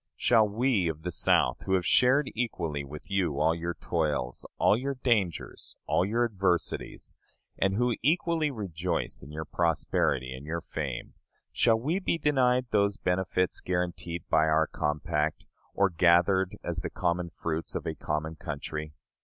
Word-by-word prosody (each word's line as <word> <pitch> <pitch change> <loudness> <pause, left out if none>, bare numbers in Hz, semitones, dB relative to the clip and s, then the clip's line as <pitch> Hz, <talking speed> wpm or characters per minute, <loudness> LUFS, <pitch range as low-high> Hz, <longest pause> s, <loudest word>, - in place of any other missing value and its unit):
Shall 110 -3 +4
we 110 -4 +1
of 80 -1 -4
the 90 - -2
South, - - +2
who 95 - +3
have 90 -2 0
shared 130 - +4
equally 85 -11 -2
with 75 +6 -10
you 90 -7 0
all 80 +2 +3
your 85 +1 -3
toils, 75 -7 -2
all - - +4
your 135 +4 -2
dangers, 110 - -1
all - - +2
your 115 +5 +1
adversities, 95 -6 -1 0.5
and 95 0 +2
who 120 +1 +1
equally 160 +3 +2
rejoice 90 - -3
in 70 - -11
your 80 +1 -5
prosperity 75 -6 0
and 65 +2 -9
your 80 +3 -3
fame - - -5 0.4
shall 110 -1 +3
we 155 +10 0
be 185 - 0
denied 130 -5 +2
those 100 -1 +2
benefits 90 0 0
guaranteed 90 -2 -3
by 80 - +4
our 80 0 +3
compact, 75 0 -1 0.3
or 100 -1 +3
gathered 90 +2 +3
as - - -3
the - - -3
common 85 -1 -1
fruits 80 -1 -4
of - - -3
a - - -2
common 75 +1 -3
country? 75 -1 -5
90 Hz, 155 wpm, -28 LUFS, 80-110 Hz, 0.5 s, Shall